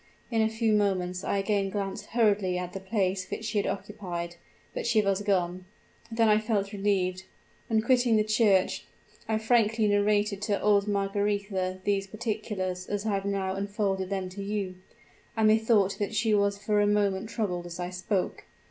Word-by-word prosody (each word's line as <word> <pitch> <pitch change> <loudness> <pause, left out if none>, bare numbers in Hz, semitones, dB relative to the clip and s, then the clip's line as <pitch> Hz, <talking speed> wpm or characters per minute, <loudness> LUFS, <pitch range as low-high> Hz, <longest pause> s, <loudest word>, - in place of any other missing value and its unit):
In 225 -1 +2
a 220 - +3
few 225 0 +1
moments 185 -3 0
I - - 0
again 195 0 0
glanced 195 0 -4
hurriedly 205 -5 +2
at 180 0 -4
the 195 - -4
place 190 -2 -1
which 220 - -5
she 215 -1 0
had - - -1
occupied 185 -4 -4 0.4
but - - -3
she 230 -2 +4
was 200 -1 +1
gone. 185 -3 0 0.5
Then 225 0 +3
I 215 0 +5
felt 215 -2 -1
relieved! 190 -2 0 0.4
On 220 -1 +3
quitting 245 0 +3
the 215 - +4
church, 215 -3 +2 0.4
I 220 - +2
frankly 220 -1 +2
narrated 205 0 +2
to 205 -1 0
old 205 -1 +3
Margaretha 200 -2 -1
these 195 -1 0
particulars 200 -4 -3
as 205 +1 -3
I - - 0
have 195 0 -1
now 195 -1 -1
unfolded 195 -1 -1
them 190 -2 -2
to 195 +2 -8
you; 200 -2 -2 0.6
and 220 -1 +4
methought 215 -2 +3
that 205 +1 -2
she 220 -1 +2
was 200 -1 +2
for 205 +1 +1
a 205 - +3
moment 205 0 +1
troubled 180 -7 -2
as 175 0 -8
I 180 0 -3
spoke! 185 +1 -2
200 Hz, 175 wpm, -28 LUFS, 190-215 Hz, 0.6 s, I